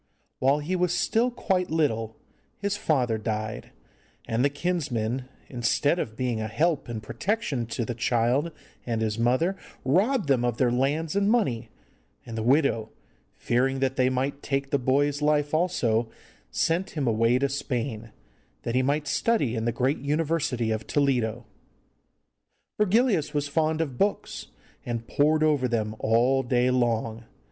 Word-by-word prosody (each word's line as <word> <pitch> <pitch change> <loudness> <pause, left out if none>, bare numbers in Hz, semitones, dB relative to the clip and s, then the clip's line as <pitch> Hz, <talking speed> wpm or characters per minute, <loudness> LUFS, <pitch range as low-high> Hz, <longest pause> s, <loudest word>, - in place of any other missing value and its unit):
While 135 +2 +3
he 155 +5 -2
was 180 -1 +1
still 230 +6 +2
quite 190 -6 -1
little, 115 -9 0 0.4
his 200 0 -1
father 125 - +1
died, 110 0 -4 0.6
and 115 +1 0
the 140 - +4
kinsmen, 135 -7 -2 0.2
instead 130 +6 +1
of 110 -6 -4
being 120 -3 -1
a 110 - -2
help 145 +5 0
and 110 -2 -5
protection 145 - -2
to 115 0 -3
the 120 - -3
child 120 +6 +1 0.3
and 115 -2 -2
his 110 0 -2
mother, 130 +11 +2 0.3
robbed 195 - +2
them 130 -3 +3
of 120 -2 0
their 125 -2 +2
lands 145 +6 0
and 200 0 +2
money, 125 - +1 0.6
and 115 -2 -7
the 110 - -2
widow, 125 -3 +2 0.5
fearing 130 +3 +1
that 135 0 0
they 130 -1 +3
might 135 +2 -2
take 135 0 -2
the 140 - +2
boy's 145 +3 +1
life 150 0 +2
also, 120 -10 +1 0.4
sent 170 +1 -1
him 145 - 0
away 115 +2 +3
to 140 +2 +1
Spain, 125 -5 -3 0.5
that 115 - -2
he 130 - +3
might 145 +3 0
study 145 - +1
in 110 0 -2
the 120 - +2
great 130 +5 0
University 145 -6 0
of 110 0 -3
Toledo. 120 -5 0 1.3
Virgilius 205 - +2
was 145 0 0
fond 155 +2 +1
of 140 -6 -4
books, 205 +1 -1 0.4
and 115 -1 -4
pored 155 +2 +2
over 145 -5 +2
them 110 -3 -1
all 120 +4 +3
day 125 0 +2
long. 115 -2 0
135 Hz, 155 wpm, -26 LUFS, 115-155 Hz, 1.3 s, the